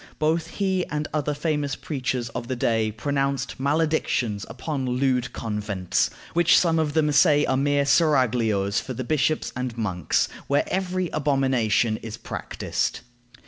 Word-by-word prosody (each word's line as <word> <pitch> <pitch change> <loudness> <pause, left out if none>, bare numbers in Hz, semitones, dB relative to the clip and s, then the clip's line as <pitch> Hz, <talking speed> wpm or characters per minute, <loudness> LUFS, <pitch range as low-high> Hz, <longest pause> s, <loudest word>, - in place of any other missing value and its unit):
Both 160 +2 +1
he 190 -2 +1
and 150 0 -3
other 150 -1 -1
famous 145 -2 -1
preachers 130 -4 -3
of 120 - -6
the 130 - -2
day 115 -2 +1
pronounced 135 +3 -2
maledictions 140 -7 0
upon 130 +3 -3
lewd 125 -1 +1
convents, 105 -4 -1 0.2
which 170 0 +5
some 165 -2 +3
of 150 -2 0
them 150 -1 +2
say 145 0 +5
are 130 - +1
mere 140 +1 +2
seraglios 125 - +2
for 130 - -6
the 130 - -3
bishops 155 +3 0
and 125 -2 -4
monks, 95 -8 0 0.2
where 140 +1 +2
every 185 -1 -1
abomination 130 -6 +1
is 110 0 -8
practiced. - - -3
135 Hz, 140 wpm, -24 LUFS, 115-150 Hz, 0.2 s, which